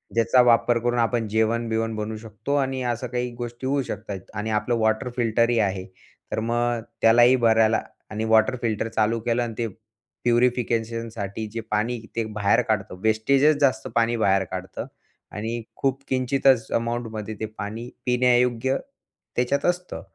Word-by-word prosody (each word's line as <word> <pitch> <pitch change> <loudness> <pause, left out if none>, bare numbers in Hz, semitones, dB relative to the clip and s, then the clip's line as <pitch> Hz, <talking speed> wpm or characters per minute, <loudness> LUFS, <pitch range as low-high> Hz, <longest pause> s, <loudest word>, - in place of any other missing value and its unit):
ज्याचा 115 +2 +5
वापर 120 0 +4
करून 120 +1 0
आपण 115 -1 +1
जेवण-बिवण 110 +1 0
बनवू 110 0 -4
शकतो 110 +5 -4
आणि 135 -1 -1
असं 120 +1 -2
काही 125 0 -2
गोष्टी 120 +1 -5
होऊ 140 0 +1
शकतात. 100 -5 -6
आणि 105 +2 -3
आपलं 105 +3 +1
वॉटर 110 +2 +1
फिल्टरही 115 0 +2
आहे, 95 -3 0 0.5
तर - - -1
मग 120 +1 0 0.2
त्यालाही 120 +3 +6
भरायला 110 -2 +3 0.3
आणि 110 +1 -2
वॉटर 110 +3 +4
फिल्टर 115 -1 -1
चालू 110 +1 +1
केलं 120 +1 0
आणि 115 -1 -4
ते 115 -1 -1 0.6
प्युरिफिकेशनसाठी 115 -3 0
जे 115 - -3
पाणी 115 +3 0 0.2
ते 115 - 0
बाहेर 110 +3 +3
काढतं, 110 -5 -2
वेस्टेजच 135 +7 +3
जास्त 130 -6 +2
पाणी 115 0 +2
बाहेर 95 -3 +3
काढतं 95 0 -5 0.5
आणि 115 +3 -4 0.2
खूप 135 0 0
किंचितच 130 -2 +2
अमाऊंटमध्ये 115 -2 -2
ते 110 - -2
पाणी 110 +2 -6 0.2
पिण्यायोग्य 125 +1 +2 0.6
त्याच्यात 130 +3 0
असतं. 180 0 -1
115 Hz, 145 wpm, -24 LUFS, 110-125 Hz, 0.6 s, त्यालाही